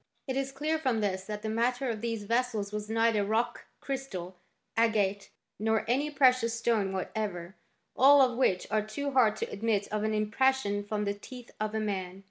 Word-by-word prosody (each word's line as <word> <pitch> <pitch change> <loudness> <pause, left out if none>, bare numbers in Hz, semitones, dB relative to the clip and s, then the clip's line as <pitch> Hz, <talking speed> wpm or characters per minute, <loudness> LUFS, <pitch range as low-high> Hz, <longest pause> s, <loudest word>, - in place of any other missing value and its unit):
"* - - -46
It 260 - -2
is 270 0 -1
clear 305 +4 -1
from 260 -7 0
this 190 -2 -1
that 210 0 -6
the - - -2
matter 245 +4 0
of 220 -3 -3
these 230 -2 -3
vessels 225 -2 -1
was 210 0 -4
neither 225 -2 +2
rock 225 +4 -1
crystal, 205 -10 -5 0.4
agate, 205 -3 +1 0.3
nor 220 0 +1
any 270 +6 +1
precious 255 -5 +3
stone 230 -4 +1
whatever, 190 -2 -4 0.4
all 280 +3 +7
of 255 -3 +4
which 195 -8 +2
are 215 - +2
too 250 +7 -4
hard 240 -5 +4
to - - -4
admit 210 -1 0
of 215 0 -2
an 215 0 0
impression 215 -1 +1
from 210 0 -2
the 200 - 0
teeth 245 +4 -11
of 215 0 -2
a - - +1
man. 190 -3 -3
220 Hz, 190 wpm, -29 LUFS, 205-250 Hz, 0.4 s, all